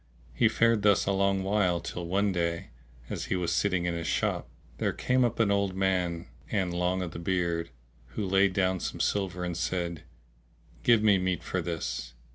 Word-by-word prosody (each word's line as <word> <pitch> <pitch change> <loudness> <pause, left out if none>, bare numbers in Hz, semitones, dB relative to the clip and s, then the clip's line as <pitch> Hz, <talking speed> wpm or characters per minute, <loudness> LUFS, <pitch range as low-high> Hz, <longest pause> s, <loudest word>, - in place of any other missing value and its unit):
He - - +4
fared 115 -2 +3
thus 100 -1 +4
a 100 - +1
long 100 0 +1
while, 95 -3 +2
till 85 0 -5
one 100 +3 +1
day, 85 -2 -2 0.4
as - - -4
he - - -1
was 90 -2 -1
sitting 90 -1 +1
in 85 - 0
his 85 -1 -3
shop, - - -1 0.3
there - - 0
came 130 0 +1
up 120 -1 0
an 110 -3 +3
old 100 -2 +1
man 90 -3 0 0.2
and 95 -4 0
long 90 +1 0
o' - - -3
the 85 - -7
beard, 85 -2 -1 0.5
who 105 - -1
laid 95 +1 +3
down 95 -1 +1
some - - -4
silver 95 -3 -1
and 90 -1 -3
said, 85 -1 -2 0.8
"Give 115 -2 +4
me 100 -3 +5
meat 90 -3 -1
for - - -2
this." 80 -7 -4
95 Hz, 190 wpm, -29 LUFS, 85-100 Hz, 0.8 s, me